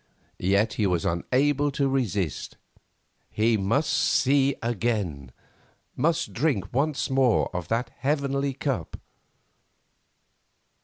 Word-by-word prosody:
Yet 100 +4 +2
he 105 -2 +1
was 90 -3 0
unable 140 +11 +1
to 140 0 +1
resist, 105 - -2 0.7
he 110 +1 +2
must 110 +10 +1
see 140 0 +3
again, 105 - -2 0.6
must 165 +5 0
drink 115 - -1
once 140 +1 0
more 130 -8 +2
of 90 -1 -3
that 115 +2 -1
heavenly 140 -1 0
cup. 130 - -3
125 Hz, 100 wpm, -26 LUFS, 100-140 Hz, 0.7 s, see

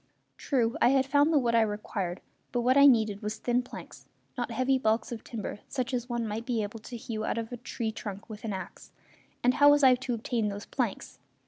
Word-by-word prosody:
True, 240 -5 0
I - - +6
had 270 0 +3
found 285 +3 +3
the 310 - +4
wood 240 -4 +2
I 230 - +5
required; 205 -4 -3 0.3
but 245 - 0
what 255 +2 +3
I 280 0 +8
needed 220 -6 +3
was 210 +1 -3
thin 245 +2 +1
planks, 250 - -11 0.3
not 245 -1 -3
heavy 255 +3 +1
balks 220 -1 0
of 230 -2 -6
timber 215 -3 -6
such 260 -1 -3
as 245 0 -2
one 240 -1 -1
might 215 +2 -3
be 235 -4 0
able 210 +2 -6
to 240 +3 -8
hew 220 -1 -5
out - - -1
of 230 0 -4
a 245 - -5
tree 230 -1 -4
trunk 205 -2 -7
with 215 -2 -9
an 220 - -3
axe; 190 -1 -7 0.5
and 250 +1 +4
how 290 +1 +6
was 290 0 +5
I 260 -1 +8
to 250 -1 -2
obtain 225 -1 -1
those 205 0 -5
planks? - - -3
235 Hz, 230 wpm, -29 LUFS, 220-255 Hz, 0.5 s, I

